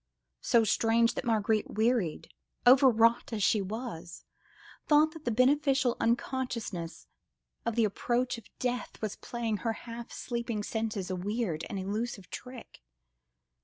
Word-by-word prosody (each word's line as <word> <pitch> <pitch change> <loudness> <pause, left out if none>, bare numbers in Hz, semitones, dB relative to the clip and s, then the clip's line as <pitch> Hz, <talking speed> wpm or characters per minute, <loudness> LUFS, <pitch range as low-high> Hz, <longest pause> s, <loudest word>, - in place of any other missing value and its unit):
So 235 -1 +4
strange, 230 +2 +3
that - - -4
Marguerite, 220 -2 +1
wearied, 220 -7 +1 0.4
overwrought 245 -3 +5
as 215 -3 -1
she 210 - +3
was, 195 -4 -6 0.6
thought 305 +1 +5
that 320 -1 -12
the - - +1
beneficial 265 +1 +3
unconsciousness 230 -8 -2 0.6
of 230 - 0
the 230 -2 +4
approach 240 +4 -1
of 220 - -18
death 245 -1 -3
was 215 -2 -3
playing 230 -3 -3
her 225 +3 -1
half 230 +1 -9
sleeping 235 -3 -3
senses 215 -4 -3
a - - -1
weird 190 -3 -2
and 205 - -4
elusive 200 +1 -4
trick. 250 - -9
230 Hz, 130 wpm, -30 LUFS, 210-245 Hz, 0.6 s, overwrought